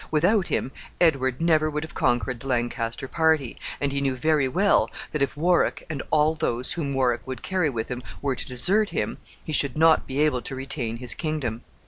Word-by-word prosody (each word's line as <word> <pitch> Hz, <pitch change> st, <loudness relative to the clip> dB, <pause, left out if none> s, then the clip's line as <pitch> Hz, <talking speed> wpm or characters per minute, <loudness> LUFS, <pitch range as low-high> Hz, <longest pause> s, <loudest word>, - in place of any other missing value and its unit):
Without 180 Hz, +5 st, +2 dB
him, 130 Hz, -, -1 dB, 0.3 s
Edward 135 Hz, -7 st, +2 dB
never 160 Hz, -2 st, +3 dB
would 150 Hz, 0 st, -3 dB
have 160 Hz, -, -9 dB
conquered 120 Hz, 0 st, 0 dB
the 135 Hz, -, -9 dB
Lancaster 120 Hz, 0 st, -2 dB
party, 160 Hz, -5 st, +1 dB, 0.2 s
and 140 Hz, -1 st, 0 dB
he 140 Hz, 0 st, -1 dB
knew 135 Hz, -2 st, 0 dB
very 150 Hz, +1 st, +2 dB
well 190 Hz, +9 st, +3 dB, 0.2 s
that 150 Hz, -, -2 dB
if 140 Hz, -, 0 dB
Warwick, 175 Hz, +3 st, +2 dB
and 140 Hz, -4 st, -3 dB
all 155 Hz, 0 st, +3 dB
those 125 Hz, -6 st, -2 dB
whom 150 Hz, -5 st, -2 dB
Warwick 125 Hz, -3 st, +1 dB
would 130 Hz, -3 st, -6 dB
carry 185 Hz, -5 st, +1 dB
with 115 Hz, -4 st, -4 dB
him, 125 Hz, 0 st, -4 dB, 0.2 s
were 130 Hz, +7 st, -1 dB
to 125 Hz, -, -5 dB
desert 190 Hz, -, +1 dB
him, -, -, -2 dB, 0.2 s
he 155 Hz, -, -5 dB
should 140 Hz, -2 st, +2 dB
not 160 Hz, 0 st, +4 dB
be 135 Hz, +1 st, -3 dB
able 150 Hz, -5 st, +2 dB
to 135 Hz, -, -6 dB
retain 130 Hz, -3 st, -3 dB
his 120 Hz, -2 st, +1 dB
kingdom. 145 Hz, -8 st, -3 dB
140 Hz, 200 wpm, -25 LUFS, 125-160 Hz, 0.3 s, not